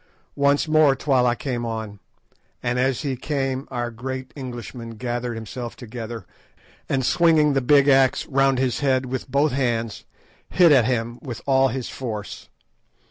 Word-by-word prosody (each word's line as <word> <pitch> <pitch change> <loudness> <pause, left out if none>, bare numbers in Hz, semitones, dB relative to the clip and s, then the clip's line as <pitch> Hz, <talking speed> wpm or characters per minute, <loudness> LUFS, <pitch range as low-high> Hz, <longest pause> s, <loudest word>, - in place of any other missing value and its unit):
Once 140 +2 +3
more 155 -3 +4
Twala 125 -3 +2
came 125 -2 -3
on, 110 -3 -5 0.6
and 120 +1 0
as 130 +2 0
he 135 -3 -1
came 135 -1 -2
our 120 -1 -3
great 130 +2 -6
Englishman 120 -3 -7
gathered 120 0 -3
himself 115 +2 -6
together, 115 -3 -7 0.6
and 130 -2 0
swinging 160 -3 +4
the 135 - +1
big 140 +2 +4
axe 135 -2 +4
round 135 -1 +2
his 130 -1 0
head 130 -2 +1
with 130 +1 -5
both 140 +3 +2
hands, 115 -4 -2 0.4
hit 175 -3 +5
at 130 -6 +5
him 120 -1 -2
with 125 -4 -6
all 135 -1 +4
his 130 -2 -4
force. 110 -6 -6
130 Hz, 150 wpm, -23 LUFS, 120-135 Hz, 0.6 s, hit